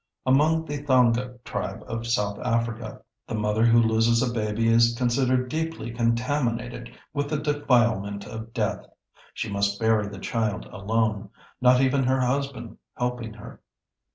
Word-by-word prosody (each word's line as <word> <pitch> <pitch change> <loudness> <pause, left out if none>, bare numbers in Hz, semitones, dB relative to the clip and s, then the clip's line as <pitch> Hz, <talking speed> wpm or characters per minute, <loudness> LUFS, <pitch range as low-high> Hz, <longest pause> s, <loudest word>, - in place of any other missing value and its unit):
Among 155 +5 +3
the 145 -2 -4
Thonga 125 -2 +2
Tribe 95 +2 -4
of 115 0 -5
South 105 -4 0
Africa, 115 -2 -2 0.2
the 115 - -3
mother 105 +1 +1
who 115 0 +5
loses 115 +1 +3
a 120 -2 -1
baby 110 0 0
is 115 +1 +4
considered 125 +1 +1
deeply 160 -5 -3
contaminated 120 +1 -1 0.2
with 145 -1 -2
the 155 - 0
defilement 120 -9 +1
of 110 +1 -8
death. 110 -4 -2 0.5
She - - -3
must 100 0 -1
bury 110 -2 +2
the 100 -1 -8
child 105 -1 -2
alone, 110 0 -1 0.3
not 125 0 +5
even 135 0 +2
her 130 +1 +2
husband 130 -2 -2 0.2
helping 125 -3 -3
her. 105 - -12
115 Hz, 145 wpm, -25 LUFS, 110-130 Hz, 0.5 s, who